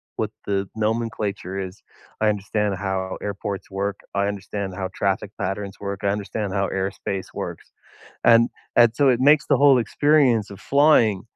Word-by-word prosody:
what - - -2
the 100 -1 -1
nomenclature 105 -4 -2
is. 95 0 -7 0.4
I 110 - +4
understand 105 0 -1
how 95 -1 -3
airports 100 -1 -5
work, 100 +1 -2 0.2
I 100 0 +1
understand 100 -1 -4
how 95 -1 -3
traffic 100 +1 -1
patterns 100 0 -3
work, 100 -1 -4
I - - +1
understand 100 0 -3
how 100 -1 +1
airspace 95 0 -3
works, - - -6 0.6
and 115 0 +6 0.3
and 120 -1 +7
so 140 -2 +4
it 125 -1 +3
makes 145 +2 +5
the - - +3
whole 140 -3 +6
experience 125 -2 +2
of 100 0 -10
flying 135 -9 +4
100 Hz, 160 wpm, -23 LUFS, 95-115 Hz, 0.6 s, and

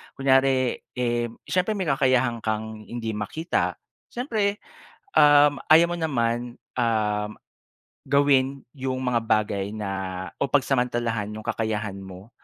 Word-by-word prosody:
Kunyari 135 -1 +2 0.2
eh 120 -1 0 0.2
siyempre 185 +4 0
may 190 -5 -2
kakayahan 130 -3 +2
kang 110 0 -3
hindi 115 -2 -4
makita, 155 - -2 0.3
siyempre, 215 -5 -1 0.6
um, 145 -1 +6
ayaw 170 +2 +7
mo - - -3
naman, 120 -5 -1 0.2
um, 105 -2 0 0.7
gawin 140 -1 +2
yung 130 -1 -3
mga 125 -2 +1
bagay 105 -2 0
na 105 -2 -4 0.5
o 140 - +1
pagsamantalahan 120 -5 0
yung 110 - -7
kakayahan 105 -3 -2
mo 95 +2 -11
125 Hz, 115 wpm, -25 LUFS, 110-140 Hz, 0.7 s, ayaw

